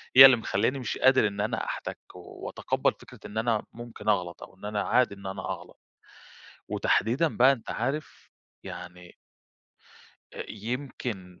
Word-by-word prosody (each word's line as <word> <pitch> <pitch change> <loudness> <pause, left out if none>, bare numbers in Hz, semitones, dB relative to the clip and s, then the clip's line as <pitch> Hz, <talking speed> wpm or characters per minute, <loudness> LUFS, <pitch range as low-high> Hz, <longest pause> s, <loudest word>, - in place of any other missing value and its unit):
هي 130 - +13
اللي 130 -2 +9
مخلياني 115 +5 0
مش 125 - -3
قادر 130 -4 +5
إن 100 0 -4
أنا 110 +2 -1
أحتك، - - -5 0.2
وأتقبّل - - -2
فكرة - - -14
إن 105 - -7
أنا 110 -1 +1
ممكن 120 -2 -6
أغلط، 90 -4 0
أو - - -13
إن 100 - -11
أنا 105 0 -1
عادي 120 0 +2
إن 100 0 -14
أنا 95 0 -5
أغلط، - - -7 0.9
وتحديدًا 130 +10 +1
بقى 130 +3 +7
أنت 125 -5 -4
عارف 135 +5 -4 0.3
يعني 90 0 -9 1.2
أ - - -6
يمكن 110 -5 -5
110 Hz, 145 wpm, -28 LUFS, 100-125 Hz, 1.2 s, هي